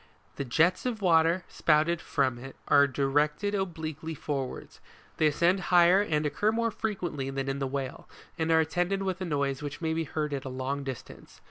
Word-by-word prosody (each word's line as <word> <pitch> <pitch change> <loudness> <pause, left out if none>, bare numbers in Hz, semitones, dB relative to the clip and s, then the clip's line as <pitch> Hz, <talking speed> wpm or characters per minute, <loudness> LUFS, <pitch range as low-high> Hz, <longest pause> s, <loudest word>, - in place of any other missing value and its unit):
The 140 - -3
jets 165 - +2
of 220 -4 -3
water 165 0 +4
spouted 160 +2 +2
from 130 -5 0
it, 135 +2 -10
are 145 0 +6
directed 145 +8 0
obliquely 160 -4 -4
forwards, 140 -3 -5 0.4
they 155 - +4
ascend 170 +6 +2
higher 180 +2 +6
and 155 -6 0
occur 205 +9 +1
more 230 0 0
frequently 175 -11 -3
than 135 0 -3
in 135 0 -2
the 135 - -1
whale, 135 -1 -5 0.3
and 160 -1 -1
are 160 0 +5
attended 180 +5 -1
with 190 -1 -3
a - - -1
noise 140 -4 -1
which 145 -1 -6
may 160 -1 -1
be 165 0 -1
heard 150 0 -3
at 135 -1 -3
a 130 - -5
long 130 +2 -3
distance. 130 -3 -9
155 Hz, 190 wpm, -28 LUFS, 140-175 Hz, 0.4 s, are